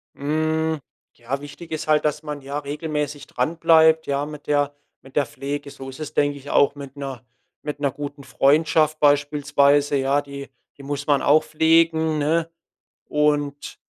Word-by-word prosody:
Hm, 155 +2 0 0.3
ja, 130 +4 -5
wichtig 160 +3 -11
ist 155 0 -4
halt, 155 0 +3
dass 150 +1 -1
man, 150 -1 -6
ja, 140 +2 -4
regelmäßig 150 -1 -4
dran 155 +7 -2
bleibt, 160 -1 +5
ja, 140 +1 0
mit 150 -1 -10
der 145 -1 +1 0.3
mit 135 - -17
der 145 - +3
Pflege. 145 0 -5
So 135 0 -9
ist 130 +3 -11
es, 155 0 -6
denke 145 0 +1
ich, 140 +1 -11
auch 145 0 +3
mit 140 -1 -10
'ner 135 -3 -6 0.4
mit 145 -1 -5
'ner 140 -2 0
guten 140 0 -7
Freundschaft 155 +2 +2
beispielsweise, 145 0 +3
ja. 135 +2 +1
Die 140 -1 -9 0.3
die 140 - -12
muss 145 +1 -4
man 145 -2 +3
auch 150 +2 +4
pflegen, 160 0 +2
ne? 165 +3 +1 0.6
Und, 145 -1 -1
145 Hz, 170 wpm, -22 LUFS, 140-155 Hz, 0.6 s, bleibt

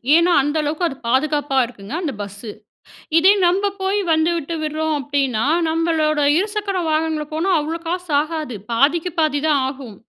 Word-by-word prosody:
ஏன்னா, 340 +2 +4
அந்த 295 +3 -1
அளவுக்கு 305 +4 -1
அது 275 - -6
பாதுகாப்பா 285 +2 +1
இருக்குங்க. 225 0 -10
அந்த 315 -6 -2
பஸ்ஸு. 205 +2 -8 0.7
இதே 375 +5 +6
நம்ப 395 +3 +1
போய் 390 +2 0
வந்து 320 +2 +2
விட்டு 330 +1 -4
விடுறோம் 310 0 -1
அப்படின்னா, 270 -5 -1 0.2
நம்பளோட 320 -2 +1 0.2
இருசக்கர 410 0 -2
வாகனங்கள்ல 310 -1 -1
போனா 335 +5 0
அவ்ளோ 320 +3 -3
காசு 355 -1 -3
ஆகாது. 310 -6 -5 0.2
பாதிக்கு 325 +8 +2
பாதி 300 -3 +1
தான் 290 -3 +3
ஆகும். 260 -6 -9
310 Hz, 155 wpm, -20 LUFS, 280-335 Hz, 0.7 s, இதே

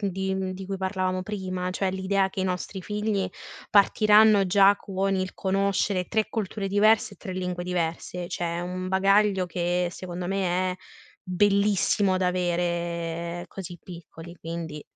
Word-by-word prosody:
di, 190 -1 -1
mhmm 190 -1 -2
di 190 0 -7
cui 195 0 -3
parlavamo 185 -1 -1
prima, 185 -3 -3
cioè, 190 +1 -1
l'idea 190 +1 +1
che - - -10
i - - 0
nostri 185 +1 -3
figli 210 0 -1 0.4
partiranno 210 0 +5
già 200 +2 +5
con 195 0 -1
il 185 0 -3
conoscere 195 -1 0
3 220 -1 0
culture 210 -2 -3
diverse 205 +2 +3
e - - -24
3 190 - -7
lingue 180 -1 -3
diverse, 175 0 -3
cioè 175 - -3
è - - -2
un 180 +1 -4
bagaglio 195 0 +3
che, 175 0 0
secondo 180 -1 -6
me, 185 -1 0
è - - -9 0.5
bellissimo 200 0 +2
da 185 -1 +1
avere 170 -1 -2
così 180 -2 -8
piccoli, 170 -1 -11
quindi 165 -2 -6
185 Hz, 150 wpm, -26 LUFS, 180-195 Hz, 0.5 s, partiranno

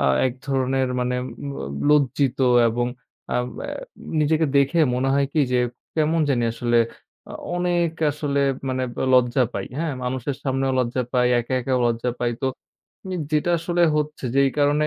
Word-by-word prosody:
আ - - +1 0.2
একধরনের 130 0 -1
মানে 125 0 0
অব 140 +2 -7
অ 70 - -4
লজ্জিত 140 -2 +2 0.3
এবং 120 +2 0 0.5
আব 125 0 +1 0.2
অ্যা - - -5 0.5
নিজেকে 155 +1 +2
দেখে 140 +5 +3 0.2
মনে 130 +2 0
হয় 140 0 +3
কী 155 - +2
যে 125 - +3 0.4
কেমন 160 +1 +2
জানি 120 -4 +2
আসলে 120 0 0 0.5
আ - - -7 0.2
অনেক 175 -2 +1 0.2
আসলে 140 -1 -1 0.3
মানে 130 0 -1
ব - - -28 0.2
লজ্জা 125 0 +4
পাই, - - -3
হ্যাঁ? 165 -3 -1
মানুষের 130 +2 -2
সামনেও 135 -1 0
লজ্জা 125 +1 0
পাই। 125 -1 +3
একা-একাও 130 +1 -1
লজ্জা 120 +1 0
পাই। 120 -1 +1
তো 135 - +2 0.9
যেটা 155 +3 +1
আসলে 175 +1 0 0.2
হচ্ছে 150 -3 -3
যেই 140 0 +4
কারণে 145 +1 +3
135 Hz, 155 wpm, -23 LUFS, 125-150 Hz, 0.9 s, লজ্জা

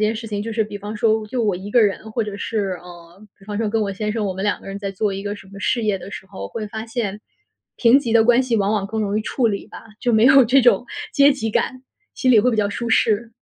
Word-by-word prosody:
件 220 - -1
事 225 +1 -7
情， 205 -2 -3
就 225 - -5
是 220 0 0
比 205 -1 -8
方 210 +2 -6
说 220 -2 +1
就 240 +3 -2
我 205 - +1
一 190 +3 -7
个 240 -1 +5
人 210 +2 -1
或 225 0 -1
者 205 -1 -6
是 200 -5 -2
呃， 175 +2 -14 0.2
比 195 - -18
方 205 0 -5
说 220 -2 0
跟 220 0 0
我 200 - -2
先 210 +2 -3
生， 220 -2 -2
我 190 - -1
们 190 - -5
两 205 0 -1
个 - - -13
人 195 0 -6
在 200 -1 -4
做 195 +1 -1
一 195 +1 -5
个 205 0 -4
什 195 - -14
么 200 +1 -11
事 235 +3 0
业 200 -2 +1
的 195 - -10
时 195 - -8
候， 190 0 -8
会 220 -2 -5
发 220 +2 -6
现， 215 -3 -3 0.6
平 245 +3 +5
级 235 -5 -2
的 225 -1 +6
关 240 +2 +4
系 245 -3 0
往 200 +1 +1
往 200 -2 0
更 220 +1 -2
容 205 +1 -1
易 - - -1
处 235 +2 0
理 200 -2 -2
吧。 - - -11 0.2
就 245 - +1
没 220 0 +4
有 270 +1 +8
这 255 +2 +4
种 245 +1 +4 0.3
阶 280 0 +6
级 260 -6 -2
感， 255 +4 -1 0.3
心 255 -2 +2
里 220 - +7
会 250 - +2
比 225 - -1
较 210 - +2
舒 235 +3 -4
适。 225 +1 +1
215 Hz, 315 characters per minute, -21 LUFS, 200-230 Hz, 0.6 s, 有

